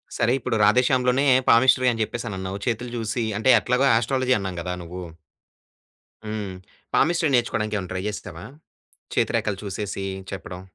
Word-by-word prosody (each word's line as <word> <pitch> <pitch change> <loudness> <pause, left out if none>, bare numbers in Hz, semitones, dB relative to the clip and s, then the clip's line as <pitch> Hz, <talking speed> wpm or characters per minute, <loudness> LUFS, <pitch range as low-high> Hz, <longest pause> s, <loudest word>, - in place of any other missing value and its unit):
సరే 115 - +2
ఇప్పుడు 115 - -2
'రాధేశ్యామ్‌లోనే' 125 +4 +3 0.2
పామ్‌హిస్టరి 130 +2 +5
అని 115 -1 -3
జెప్పేసి 110 - -5
అని 100 - -5
అన్నావు. 95 +1 -4
చేతులు 120 +1 -2
జూసి 115 +1 -2
అంటే 110 +4 +1
ఎట్లాగో 125 +2 +1
ఆస్ట్రాలజీ 130 +2 +1
అన్నాం 95 -2 -4
గదా! 90 +1 -3
నువ్వు. 90 +2 -7 1.2
హ్మ్ 105 -3 -4 0.4
పామిస్టరీ 165 -2 +2
నేర్చుకోవడానికి 110 -3 -1
ఏమన్నా 95 -2 -6
ట్రై 95 0 -3
జేసావా? 95 -5 -7 0.7
చేతి - - +2
రేకలు 105 -2 -2
చూసేసి 100 0 -4 0.3
చెప్పడం. 90 -1 -7
110 Hz, 145 wpm, -24 LUFS, 95-125 Hz, 1.2 s, పామ్‌హిస్టరి